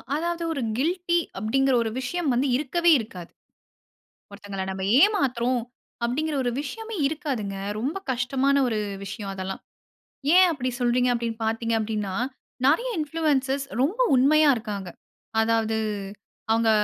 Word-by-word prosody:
அதாவது 340 +2 -2
ஒரு 275 - -3 0.2
கில்டி 345 +4 +1 0.2
அப்டீங்குற 270 +6 +2
ஒரு 225 - -2
விஷயம் 330 +4 -2
வந்து 255 +4 +1
இருக்கவே 335 +5 +2
இருக்காது. 185 -6 -8 1.0
ஒருத்தங்கள 200 -1 -6
நம்ப 190 0 -5 0.2
ஏமாத்துறோம் 255 - +2 0.4
அப்டீங்குற 300 +6 -1
ஒரு 245 - +1
விஷயமே 445 +9 -6
இருக்காதுங்க. 275 - -3 0.2
ரொம்ப 275 - -2
கஷ்டமான 260 +3 +1
ஒரு 220 -2 -1 0.3
விஷயம் 200 0 -6
அதெல்லாம். 190 0 -5 0.7
ஏன் 370 0 +8
அப்படி 260 -5 -2
சொல்றீங்க 245 0 +2
அப்டீன்னு 230 -1 -3
பாத்தீங்க 225 +1 -1
அப்டீன்னா, 210 -3 -2 0.5
நெறைய 330 - +3
இன்ஃப்ளூயன்ஸர்ஸ் 285 -3 0 0.2
ரொம்ப 360 - 0 0.2
உண்மையா 295 +4 +5
இருக்காங்க. 205 -5 -5 0.5
அதாவது 225 0 +1 0.7
அவங்க 225 0 +3
255 Hz, 120 wpm, -25 LUFS, 225-305 Hz, 1.0 s, ஏன்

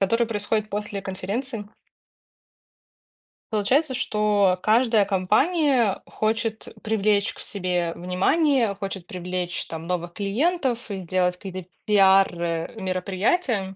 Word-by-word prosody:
Которые 230 +4 +2
происходят 215 0 -1
после 205 0 -3
конференции. 205 +4 -4 1.8
Получается, 260 +8 +2
что 210 -5 +2
каждая 225 -2 +4
компания 230 - +2
хочет 220 0 -2 0.2
привлечь 210 -2 +1
к - - -15
себе 180 -3 -2
внимание, 225 - +2
хочет 195 -2 -6
привлечь 180 -1 -4
там 160 0 -7
новых 175 -1 -3
клиентов 245 - -1
и 200 - -3
делать 180 0 0
какие-то 185 -2 -8 0.2
пиар, 195 -2 +6
э, 165 +3 -2
мероприятия 190 - 0
200 Hz, 105 wpm, -24 LUFS, 185-225 Hz, 1.8 s, пиар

